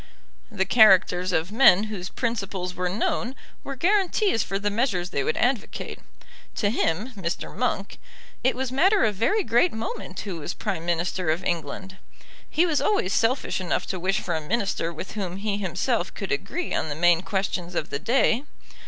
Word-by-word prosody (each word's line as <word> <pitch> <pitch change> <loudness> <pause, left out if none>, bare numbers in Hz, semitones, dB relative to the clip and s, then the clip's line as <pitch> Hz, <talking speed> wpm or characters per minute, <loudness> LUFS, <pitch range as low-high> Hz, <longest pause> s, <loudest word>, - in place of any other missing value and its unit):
The 195 -3 0
characters 190 -4 +5
of 165 +2 0
men 215 -4 +6
whose 200 -4 -5
principles 195 -6 -3
were 180 0 -2
known 230 +5 -1 0.3
were 275 - -5
guarantees 385 - +2
for 195 - -2
the 205 +1 -1
measures 200 -6 0
they 140 - 0
would 155 - -1
advocate. 245 -3 -1 0.6
To 205 -2 +1
him, 210 +3 0
Mr. 185 -5 -4
Monk, - - -2 0.4
it 260 - +2
was 260 0 -3
matter 380 +10 +4
of 215 - +1
very 390 - +1
great 240 +8 +3
moment 205 -4 -5
who 195 -5 -5
was 160 +3 -5
Prime 180 -5 -3
Minister 175 0 -1
of 165 +4 0
England. 175 +3 -3 0.5
He 330 +3 +3
was 315 -4 +1
always 305 - +1
selfish 230 -3 +1
enough 180 - -1
to 185 - -4
wish 190 +2 0
for 175 - -3
a 160 - -1
Minister 190 -1 -1
with 170 +3 -7
whom 190 -4 -4
he 200 0 -2
himself 190 +2 -1
could 195 - -5
agree 330 - -2
on 160 - -1
the 145 - -3
main 175 +1 +4
questions 190 -2 -2
of 150 - -2
the 140 - -2
day. 240 - +2
195 Hz, 180 wpm, -25 LUFS, 180-235 Hz, 0.6 s, men